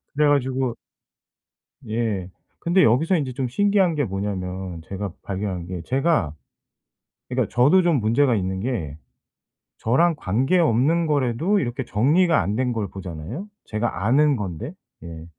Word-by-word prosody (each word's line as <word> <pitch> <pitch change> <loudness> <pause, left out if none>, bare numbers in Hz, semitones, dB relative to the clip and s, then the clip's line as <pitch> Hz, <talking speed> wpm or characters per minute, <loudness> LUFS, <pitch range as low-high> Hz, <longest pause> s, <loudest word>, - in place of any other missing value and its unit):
그래 150 0 +3
가지고 130 -3 0 1.1
예. 110 -5 -2 0.3
근데 175 +2 +3
여기서 155 +11 +3
인제 135 -5 -3
좀 130 +1 -2
신기한 195 +2 +2
게 145 -2 0
뭐냐면 95 -3 -4
제가 100 +3 -5
발견한 95 -3 -4
게 90 -1 -5
제가 135 - +1 1.0
그러니까 125 -3 0
저도 145 +10 +5
좀 170 -3 +3
문제가 120 +4 +3
있는 95 -2 -2
게 95 - -3 0.8
저랑 165 +9 +2
관계없는 145 - +2
거라도 150 - +1
이렇게 125 -2 -3
정리가 155 - +3
안 100 - -2
된 125 +1 0
걸 110 -3 -2
보잖아요, 95 - -7 0.2
제가 110 -3 -2
아는 145 +5 +4
건데. 100 - -5 0.3
예. 80 -1 -9
120 Hz, 275 characters per minute, -23 LUFS, 95-150 Hz, 1.1 s, 저도